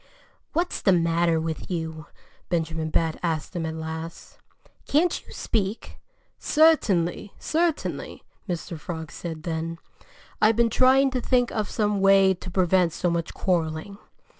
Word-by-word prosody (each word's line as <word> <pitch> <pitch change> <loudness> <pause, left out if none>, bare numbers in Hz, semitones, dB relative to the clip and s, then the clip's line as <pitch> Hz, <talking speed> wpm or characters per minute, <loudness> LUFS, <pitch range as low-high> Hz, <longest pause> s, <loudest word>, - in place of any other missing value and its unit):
"What's 345 +3 -1
the 195 - +4
matter 170 -1 +2
with 160 0 -4
you?" 160 -3 -4 0.4
Benjamin 160 -2 -1
Bat 160 0 0
asked 160 -2 -2
him 165 -2 -2
at 160 - -4
last. 160 +1 -7 0.5
"Can't 330 +4 +2
you - - -16
speak?" 210 -1 -3 0.4
"Certainly! 205 - +2
Certainly!" 325 -1 -2 0.3
Mr. 170 -1 -4
Frog 160 -1 -6
said 160 -3 -7
then. 165 0 -3 0.6
"I've 215 +1 +5
been 235 0 +3
trying 265 +3 +5
to 255 -1 -1
think 245 0 +2
of 215 -3 -2
some 210 -2 0
way 195 -1 +6
to 185 0 -9
prevent 180 -2 +2
so 175 +1 0
much 170 -1 -2
quarreling. 175 +2 -1
175 Hz, 140 wpm, -25 LUFS, 160-215 Hz, 0.6 s, way